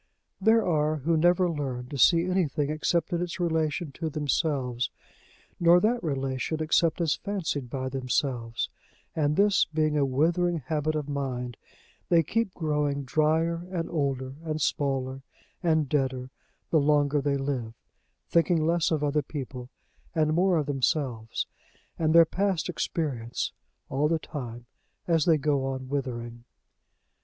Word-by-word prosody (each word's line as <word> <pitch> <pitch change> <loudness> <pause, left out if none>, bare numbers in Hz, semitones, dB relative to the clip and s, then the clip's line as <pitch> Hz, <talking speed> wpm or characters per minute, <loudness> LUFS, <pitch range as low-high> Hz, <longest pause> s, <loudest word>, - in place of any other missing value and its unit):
There 220 +2 +4
are 155 -2 +2
who 155 +3 0
never 175 +3 +4
learn 135 -6 -3
to 140 - -5
see 170 +6 +5
anything 155 -6 0
except 165 +3 0
in 170 - 0
its 175 +1 -4
relation 160 -2 0
to 160 +3 -4
themselves, 140 -4 -1 0.7
nor 170 +1 +6
that 230 +5 +1
relation 135 0 -2
except 160 +1 +2
as 160 -3 +2
fancied 165 - -3
by 130 +1 -3
themselves; 130 -3 -1 0.5
and, 150 -2 +1
this 200 +1 +4
being 155 -1 0
a 145 - +3
withering 165 +6 +2
habit 155 +2 -1
of 150 -2 -2
mind, 130 -4 -3 0.5
they 165 -1 +5
keep 230 +3 0
growing 150 -3 0
drier, 160 +5 +1
and 170 -3 -2
older, 135 -4 -1
and 155 -1 -2
smaller, 135 -2 -1 0.4
and 160 -4 +2
deader, 130 -3 -1 0.4
the 160 - +5
longer 145 0 +3
they 140 0 +1
live 130 -5 -3 0.5
thinking 170 -1 +2
less 170 0 +2
of 155 -2 0
other 150 +1 +2
people, 130 -3 -7 0.5
and 155 -1 +2
more 180 +1 +3
of 150 - 0
themselves 135 -4 -1 0.5
and 160 0 +2
their 165 0 +9
past 190 +1 -1
experience, 125 -8 -2 0.4
all 140 +3 +1
the 165 +1 +2
time 120 -7 -7 0.4
as 165 -3 +3
they 165 -3 +5
go 145 -2 +1
on 130 -1 -4
withering. 120 -4 -4
150 Hz, 145 wpm, -27 LUFS, 135-165 Hz, 0.7 s, their